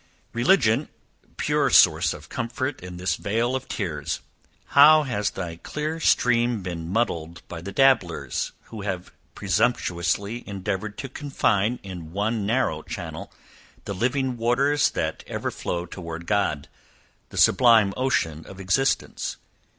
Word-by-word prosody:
Religion, 120 - +3 0.5
pure - - +1
source - - +5
of - - -9
comfort 130 +4 -3
in 90 -1 -8
this 90 +1 -1
vale 115 +5 0
of 130 0 -4
tears! 85 -8 -3 0.5
how 155 +2 +7
has 105 -7 -1
thy 85 -3 -6
clear 150 - -4
stream 120 - +2
been 85 -2 -5
muddied 85 -6 -1
by 85 -1 -7
the 100 +3 -6
dabblers, 95 - +2 0.2
who 110 -2 -6
have 95 -3 -4 0.2
presumptuously 100 +1 0
endeavoured 100 +1 -4
to 135 - -5
confine 125 -5 0
in 90 -5 -8
one 105 +1 -1
narrow 115 -10 +1
channel, - - -7 0.5
the 100 - -3
living 130 +5 0
waters 135 +5 +2
that - - -3
ever - - -3
flow 85 0 -3
toward 85 -1 -7
God 85 -8 0 0.6
the - - -10
sublime 110 -2 +5
ocean 80 - 0
of 95 - -11
existence! 95 +8 0
105 Hz, 130 wpm, -24 LUFS, 90-125 Hz, 0.6 s, how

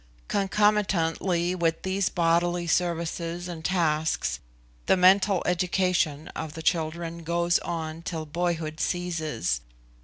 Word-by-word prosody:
Concomitantly 190 -4 +1
with 165 -2 0
these 190 0 0
bodily 175 +1 +1
services 170 0 -1
and 170 -3 -7
tasks, 160 -3 0 0.5
the - - +5
mental 190 +1 +5
education 180 -4 +1
of 160 -2 -6
the 160 - -7
children 165 0 -1
goes 170 +1 +2
on 160 -1 -4
till 165 -2 -4
boyhood 160 -1 -2
ceases. 160 - -1
170 Hz, 110 wpm, -26 LUFS, 160-180 Hz, 0.5 s, the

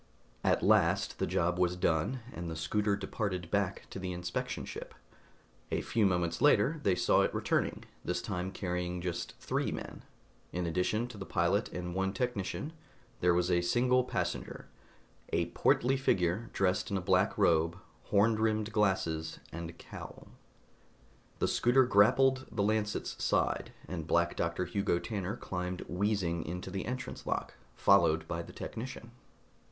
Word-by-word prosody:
At - - +2
last - - +3
the - - +1
job 90 +1 +1
was 90 0 +2
done, 90 +8 0
and 85 0 -5
the 80 - -4
scooter 100 +6 +1
departed 95 -3 -3
back 100 -2 0
to - - -5
the 90 -1 -3
inspection 90 0 -3
ship. - - -8 0.7
A - - 0
few 110 -3 +2
moments 85 -2 0
later 145 +2 +4
they 95 -9 +3
saw 90 0 +4
it - - +2
returning, - - 0 0.2
this 90 0 -1
time 90 0 -3
carrying 90 -1 -2
just 85 -1 -4
three - - -1
men. - - -6 0.5
In 90 0 -2
addition 90 +7 0
to 110 -4 -10
the 95 - -5
pilot 85 +4 +1
and 90 -1 -4
one 95 +1 0
technician, 125 - -2 0.5
there 90 -1 +4
was 90 +1 +2
a 85 0 +3
single 125 +8 +3
passenger: - - -3 0.6
a - - 0
portly 130 +3 +3
figure 95 -3 +1
dressed 95 +2 +1
in 100 - 0
a - - 0
black 95 +2 +2
robe, 85 -3 +3 0.3
horn 105 +2 +4
rimmed 110 -1 +1
glasses 90 -7 +1
and 85 0 -6
cowl. - - -10 1.1
The - - +1
scooter 125 +2 +4
grappled 130 +4 +4
the 105 -2 0
Lancet's 105 0 -1
side, - - +1 0.2
and 80 -4 -5
Black 85 0 +2
Doctor 85 +2 -1
Hugo 90 0 0
Tanner 100 +1 -3
climbed 90 0 -4
wheezing 90 -2 0
into 90 +3 -5
the 95 +1 -3
entrance 125 +1 -5
lock, - - -2 0.2
followed 80 -5 +4
by 85 0 -2
the - - -10
technician. 120 0 -6
95 Hz, 155 wpm, -32 LUFS, 85-105 Hz, 1.1 s, later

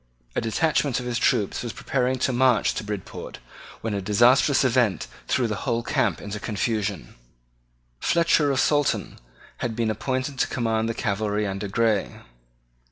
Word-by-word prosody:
A - - +1
detachment 140 +3 +1
of 125 - -6
his 120 -1 -1
troops 100 - +1
was 120 -2 -5
preparing 130 -1 -1
to 130 +1 0
march 125 -3 +3
to - - -4
Bridport 105 -2 -6 0.4
when 110 -2 -2
a 100 - -2
disastrous 120 +8 +4
event 120 -8 +2 0.2
threw 130 -1 +1
the 105 -2 -3
whole 120 +1 -1
camp - - 0
into 105 +1 -6
confusion. 105 - -2 0.9
Fletcher 165 -3 +3
of 135 -1 +1
Saltoun 145 0 +1 0.4
had 115 -2 -3
been 115 -1 0
appointed 130 +4 -3
to - - +2
command 115 -2 -1
the 115 - -2
cavalry 105 0 -1
under 100 +1 -3
Grey. 110 0 0
115 Hz, 155 wpm, -24 LUFS, 105-130 Hz, 0.9 s, disastrous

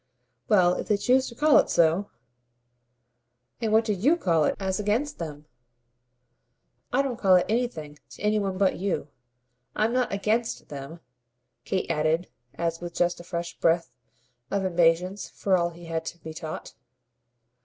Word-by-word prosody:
"Well, 180 -5 +5
if - - -5
they 210 - +2
choose 260 +5 +2
to 235 - -12
call 300 +2 +5
it - - +1
so 170 +4 +3 0.7
!" 120 - -47
"And 225 -2 0
what 220 +1 +4
do 215 - +1
YOU 260 - +3
call 165 - +2
it - - +1
as 190 -1 -1
against 220 +8 -1
them?" 150 -3 -6 1.5
"I 275 +3 +3
don't 250 -4 -3
call 190 -2 +5
it 180 - +4
anything 170 - -2
to - - -13
any 210 0 +2
one 195 -2 -2
but 195 -1 +2
you. 190 -6 -2 0.7
I'm 220 +2 +1
not 255 -1 +1
'against' 215 +4 -1
them!" 145 +4 -8 0.6
Kate 190 - -1
added 160 +3 0 0.3
as 165 0 -2
with 175 -1 -7
just 175 0 +1
a - - -9
fresh 170 -1 -5
breath 165 +1 +2 0.6
of 200 -1 -1
impatience 180 +2 +2
for 195 -2 +1
all 170 -1 +1
he 170 0 -13
had 165 -1 -3
to 170 - -6
be 160 -1 -9
taught. 155 -1 -7
180 Hz, 165 wpm, -26 LUFS, 165-210 Hz, 1.5 s, Well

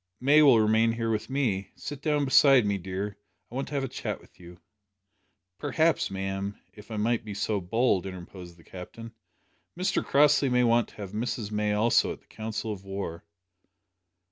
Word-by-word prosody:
May 145 +4 +5
will 135 -6 +7
remain 110 +1 +3
here 115 -1 -2
with 110 +2 -2
me. 120 -8 -1
Sit 145 -1 -7
down 150 -1 +1
beside 135 -2 +6
me, 100 -1 0
dear, 95 +3 -5 0.3
I - - -13
want 135 +2 -3
to 145 - -6
have 140 - 0
a - - -1
chat - - -5
with - - -22
you." 85 0 -13 1.0
"Perhaps, 160 +3 +1
ma'am, 95 +1 -4
if 105 +1 -14
I 110 - -5
make 115 +2 +1
so 105 0 -1
bold," 95 0 +1
interposed 90 -1 -10
the 85 - -19
Captain, 115 +7 -10 0.6
"Mr 185 +1 0
Crossley 145 -1 +4
may 125 0 +3
want 120 -1 +3
to - - -19
have 100 -2 -8
Miss 110 -1 -3
May 105 0 0
also 110 +3 +3
at - - -8
the - - -31
council 110 0 -5
of 95 -2 -10
war." 95 -4 -5
110 Hz, 180 wpm, -27 LUFS, 95-130 Hz, 1.0 s, will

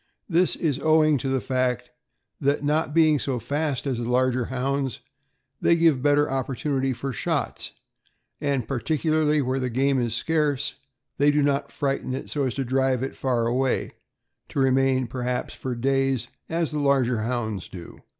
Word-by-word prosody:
This 180 0 +2
is 145 -5 -1
owing 155 -2 +4
to 135 - -2
the 135 0 +1
fact 125 0 -1 0.5
that, 140 +1 +1
not 150 +1 +1
being 155 -2 +4
so 130 0 -1
fast 145 +4 -2
as 130 -4 -1
the 120 0 -3
larger 125 0 +2
Hounds, 135 +1 -2 0.6
they 170 - +4
give 165 -6 +3
better 145 +1 +3
opportunity 135 +1 -1
for 135 +1 -4
shots, - - -2 0.7
and, 135 -5 0
par 135 -1 -2
ticularly 155 +2 +1
where 130 +1 0
the 130 -1 -1
game 135 +2 +1
is 115 -2 -1
scarce, 145 -1 0 0.5
they 145 +1 +5
do 145 0 +3
not 140 -1 0
frighten 135 -2 -2
it 135 - -6
so 145 -2 0
as 125 - -3
to 135 - -2
drive 130 0 +1
it 135 - -4
far 125 -3 0
away, 125 +2 0 0.6
to - - -8
remain 135 -1 +3
perhaps 125 +1 -3
for 130 -2 -4
days, 135 -1 0 0.2
as 165 -1 -1
the 150 - -2
larger 135 -4 +2
Hounds 110 -4 -2
do. 85 -2 -10
135 Hz, 170 wpm, -25 LUFS, 125-145 Hz, 0.7 s, they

